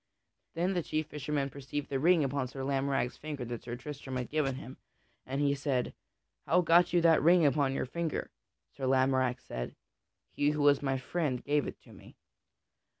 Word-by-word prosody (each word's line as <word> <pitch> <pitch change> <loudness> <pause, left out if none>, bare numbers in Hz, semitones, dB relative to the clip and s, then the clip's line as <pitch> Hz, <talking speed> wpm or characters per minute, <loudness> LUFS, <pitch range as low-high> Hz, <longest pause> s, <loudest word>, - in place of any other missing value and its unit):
Then 180 +4 +1
the 180 - 0
chief 155 -1 -2
fisherman 145 -2 -3
perceived 140 +2 -5
the 135 - -1
ring 165 +2 +4
upon 140 -1 -1
Sir 135 +1 -6
Lamorack's 135 -2 0
finger 145 -4 -5
that 120 -1 -5
Sir 120 0 -5
Tristram 135 0 -7
had 125 -2 -3
given 145 -4 0
him, 130 +1 -9 0.5
and 135 +2 -2
he 140 -1 +3
said, 135 -3 -1 0.5
"How 180 +2 +4
got 175 +1 +5
you 175 - +3
that 165 -1 +5
ring 170 +2 +5
upon 140 -2 +2
your - - -1
finger?" 165 +4 -3 0.4
Sir 135 -2 -3
Lamorack 130 -1 +2
said, - - -6 0.6
"He 145 - +1
who 150 -1 0
was 145 -1 +5
my 135 -2 0
friend 130 -1 -2
gave 145 -1 +1
it - - -7
to - - -16
me." - - -15
140 Hz, 185 wpm, -31 LUFS, 130-155 Hz, 0.6 s, got